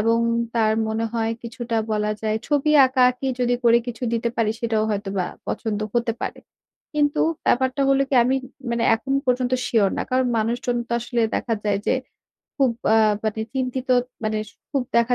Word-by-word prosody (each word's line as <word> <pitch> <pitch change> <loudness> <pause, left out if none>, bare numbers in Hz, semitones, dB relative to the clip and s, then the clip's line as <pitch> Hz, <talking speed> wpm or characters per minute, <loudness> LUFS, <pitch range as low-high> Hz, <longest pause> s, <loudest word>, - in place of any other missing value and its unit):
এবং 230 +2 +3 0.4
তার 220 -2 +3 0.2
মনে 220 +1 -1
হয় 225 -1 0
কিছুটা 235 0 -4 0.2
বলা 210 0 0
যায় 215 0 0
ছবি 295 0 +2 0.2
আঁকা-আঁকি 255 0 +2
যদি 245 0 +2
করে 235 0 +6
কিছু 245 +1 -6
দিতে 235 0 0
পারি 225 -2 +2
সেটাও 225 -2 +1
হয়তোবা 195 -3 -2 0.2
পছন্দ 215 -3 -2
হতে 235 -1 +1
পারে। - - -4 0.6
কিন্তু 290 -1 +2 0.3
ব্যাপারটা 260 +2 +2
হলো 275 0 +4
কি 275 - -1
আমি 260 +2 +2 0.3
মানে 235 0 0
এখন 265 +4 -4
পর্যন্ত 250 0 +1
sure 205 -4 +2
না। - - 0
কারণ 255 0 +2
মানুষজন 240 +2 -1
তো - - -4
আসলে 235 0 -1
দেখা 230 - -1
যায় 205 -1 +1
যে - - +4 0.7
খুব 265 -2 +5 0.2
অ্যা 220 -1 +5
মানে 220 0 -1
চিন্তিত 260 0 -2 0.4
মানে 215 0 0 0.3
খুব 275 -3 0
দেখা 235 +1 +3
235 Hz, 170 wpm, -23 LUFS, 220-255 Hz, 0.7 s, করে